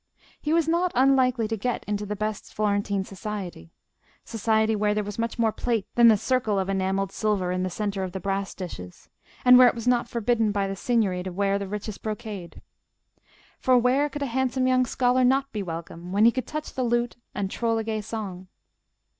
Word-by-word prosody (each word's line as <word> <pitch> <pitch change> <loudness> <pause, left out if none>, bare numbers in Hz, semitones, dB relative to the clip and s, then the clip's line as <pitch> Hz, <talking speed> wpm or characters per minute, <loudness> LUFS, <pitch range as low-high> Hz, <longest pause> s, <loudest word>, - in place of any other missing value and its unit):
He 300 - -2
was 330 -1 +3
not 345 +2 +1
unlikely 255 -3 +3
to 225 - -2
get 240 +3 -2
into 205 0 -3
the 210 - -3
best 215 0 -4
Florentine 200 -1 0
society: 190 - -7 0.6
society 220 0 +1
where 210 0 +1
there 210 - 0
was 205 +1 -7
much 230 +1 -2
more 225 -2 +2
plate 225 -3 -1
than 235 -1 +6
the 220 -2 +6
circle 230 -2 0
of 190 0 -1
enamelled 195 0 0
silver 200 -5 0
in 185 0 -1
the 185 - -1
centre 200 +1 -3
of 185 - -4
the 190 - -5
brass 195 +1 -2
dishes, 90 - -8 0.4
and 250 0 +9
where 255 - +9
it - - +2
was 235 0 -6
not 245 -1 +2
forbidden 230 -2 +1
by 200 -1 0
the 195 - -4
Signory 200 -4 0
to 185 0 -5
wear 200 +2 0
the 200 - -4
richest 210 +1 -6
brocade. 215 -5 -6 1.0
For 255 -1 +4
where 260 +4 +2
could 290 0 -4
a 255 -4 -4
handsome 260 0 +1
young 255 -1 +3
scholar 250 +1 +2
not 270 +2 +2
be 210 - -3
welcome 170 0 -7
when 205 +3 +4
he 235 - +7
could 255 +1 -4
touch 305 0 -5
the 260 - -3
lute 240 0 0 0.2
and 195 -2 -2
troll 230 -1 0
a 225 - -1
gay 220 -1 -2
song? 200 -4 -6
215 Hz, 205 wpm, -25 LUFS, 195-245 Hz, 1.0 s, and